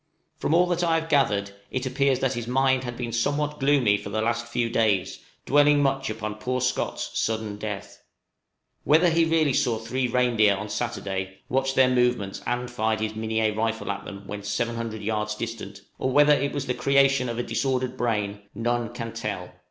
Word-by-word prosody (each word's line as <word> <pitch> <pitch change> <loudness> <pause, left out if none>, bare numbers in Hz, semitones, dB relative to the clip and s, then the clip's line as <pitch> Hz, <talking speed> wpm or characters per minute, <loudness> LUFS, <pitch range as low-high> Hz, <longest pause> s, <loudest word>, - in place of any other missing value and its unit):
From 160 - +1
all 175 +1 +5
that 175 0 -1
I 165 -1 +3
have 165 0 -8
gathered, 105 -9 +2 0.2
it 130 0 -3
appears 135 +1 +2
that 135 - +1
his 120 -1 -4
mind 130 +1 +2
had 120 -1 -5
been 120 -2 -4
somewhat 145 +5 -1
gloomy 135 -7 +3
for 100 0 -8
the 110 +2 -2
last 120 +1 -1
few 120 0 0
days, 110 -5 +1 0.3
dwelling 145 0 +4
much 135 -1 0
upon 110 -1 -5
poor 125 +3 -1
Scott's 125 - -1
sudden 110 -2 -2
death. 105 -2 -6 0.8
Whether 165 +4 +4
he 165 0 +3
really 160 -4 +2
saw 120 -3 +1
three 125 +3 -2
reindeer 120 -4 +3
on 105 +2 -6
Saturday, 95 -5 -4
watched 135 +1 0
their 130 -1 +6
movements, 125 -6 +1
and 120 0 -2
fired 110 -2 0
his 110 0 -2
Minié 110 0 0
rifle 115 -1 -1
at 100 0 -5
them 100 0 -9
when 105 +1 -6
700 115 +1 -3
yards 105 0 -1
distant, 105 -4 -6 0.2
or 130 - 0
whether 145 +2 +6
it 140 -1 0
was 140 -2 -3
the 125 - -1
creation 135 0 +3
of 115 - -4
a 120 - -1
disordered 130 -1 -1
brain, 105 -4 -1
none 120 +1 -1
can 115 -1 -5
tell. 100 -6 -4
120 Hz, 190 wpm, -25 LUFS, 110-135 Hz, 0.8 s, their